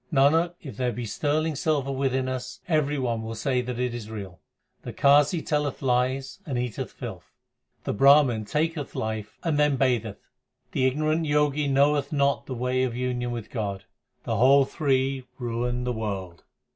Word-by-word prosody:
Nanak, 160 +5 +3
if 140 - -8
there 125 -1 0
be 120 +2 -5
sterling 155 +7 0
silver 140 -2 0
within 130 -1 0
us, 125 -1 -5
Everybody 140 -8 0
will 110 0 -5
say 130 +2 0
that 125 -1 -5
it 125 -1 -1
is 115 -3 -6
real. 100 -5 -7 0.4
The - - -7
Qazi 145 +4 +4
telleth 150 -2 -1
lies 130 +2 0
and 140 -8 -3
eateth 120 -3 -3
filth. - - -8 0.5
The - - -2
Brahman 135 -2 +5
taketh 150 +4 -2
life 110 -1 -4
and 155 -3 0
then 150 -2 +3
batheth. 120 -6 0 0.4
The 130 - +2
ignorant 155 +4 0
Jogi 150 0 +2
knoweth 140 +1 +2
not 140 -2 +1
the 130 - -4
way 125 +1 0
of 125 -2 -1
union 125 -1 -2
with 120 -3 -6
God, 100 -5 -3 0.4
The 115 - -1
whole 135 +4 +6
three 135 -3 0
ruin 120 0 -2
the 125 0 -1
world. 95 -6 -5
130 Hz, 165 wpm, -26 LUFS, 120-145 Hz, 0.5 s, whole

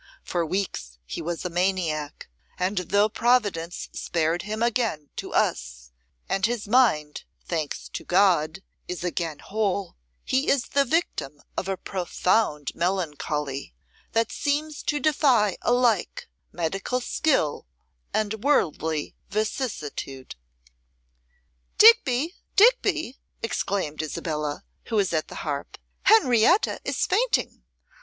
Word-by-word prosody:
For 175 -1 -1
weeks 160 - -3
he 60 - -5
was 170 +2 -4
a - - 0
maniac; 170 -5 -1 0.3
and, 185 +3 0
though 200 +4 +2
Providence 210 -8 0
spared 165 +1 0
him 215 +2 -3
again 225 - 0
to - - -5
us, - - -1 0.4
and 195 - -1
his 230 -1 0
mind, 205 -11 +2 0.2
thanks 155 - -3
to - - -6
God, 180 -2 +2 0.2
is 180 -1 -5
again 165 -3 -2
whole, 200 -1 -2 0.3
he 265 +2 +1
is 275 -3 +1
the 280 0 +3
victim 245 - -1 0.2
of 190 - -2
a 195 -1 -1
profound 180 -4 0
melancholy, 150 - -2 0.4
that 225 +1 +1
seems 295 +2 -1
to 295 - -1
defy 255 - +3
alike 240 -5 +1 0.2
medical 195 +8 -2
skill 245 - 0 0.4
and 215 0 -1
worldly 160 - +1 0.2
vicissitude.' 195 - -3 1.4
'Digby, 350 - +6 0.2
Digby!' 395 - +3 0.2
exclaimed 190 -8 -2
Isabella, 150 -1 -3 0.2
who 230 - -3
was 200 -4 +2
at 155 -1 0
the - - -10
harp, 145 -2 -4 0.3
'Henrietta 345 - +5
is - - 0
fainting. 470 +6 0
195 Hz, 115 wpm, -25 LUFS, 155-245 Hz, 1.4 s, Digby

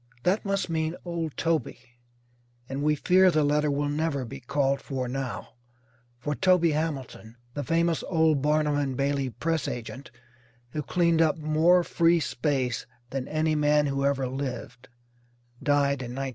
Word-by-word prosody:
That 190 +4 +2
must 195 -1 -1
mean 160 0 -1
old 165 -3 -4
Toby, 165 -6 0 0.9
and 135 +2 -4
we 150 +1 +2
fear 185 +5 +4
the 155 -3 +2
letter 150 +1 +2
will 145 +1 0
never 145 -2 -1
be 135 +3 -8
called 140 +1 0
for 130 -2 -3
now, 130 0 -4 0.7
for 135 +5 -3
Toby 180 0 +3
Hamilton, 140 -7 -4 0.2
the 145 - -3
famous 165 +3 +1
old 160 -4 +2
Barnum 150 0 +2
and 135 -3 -1
Bailey 140 -1 0
press 160 +3 -2
agent, 125 +3 -6 0.6
who 150 - -3
cleaned 170 0 +2
up 160 -1 +3
more 160 +3 +3
"free 170 0 +3
space" 130 -3 -1 0.2
than 135 -1 -3
any 155 0 0
man 150 0 +3
who 140 -1 -1
ever 140 -1 +1
lived, 125 -2 -6 0.7
died 140 -2 +2
in 120 -1 -6
1916. 135 0 -2
145 Hz, 155 wpm, -27 LUFS, 135-160 Hz, 0.9 s, fear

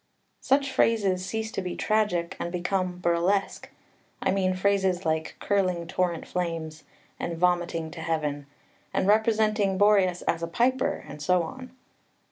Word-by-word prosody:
Such 275 0 +1
phrases 200 -7 +2
cease 220 +3 -3
to - - -3
be 180 -1 -4
tragic, 210 -6 0
and 170 - -3
become 180 0 -1
burlesque, 180 +3 0 0.5
I - - +1
mean 185 -1 +1
phrases 190 -1 +1
like 160 0 -1
"curling 185 -4 0
torrent 175 -1 -1
flames" 165 -3 -4 0.3
and 170 -1 -3
"vomiting 175 -2 0
to 165 0 -8
heaven," 150 -3 -2 0.5
and 185 - +1
representing 215 -2 +2
Boreas 195 -3 +3
as 165 - 0
a 170 - -2
piper, 255 +9 0
and 150 - -9
so 180 +3 +2
on. 255 +10 -8
185 Hz, 140 wpm, -27 LUFS, 170-205 Hz, 0.5 s, Boreas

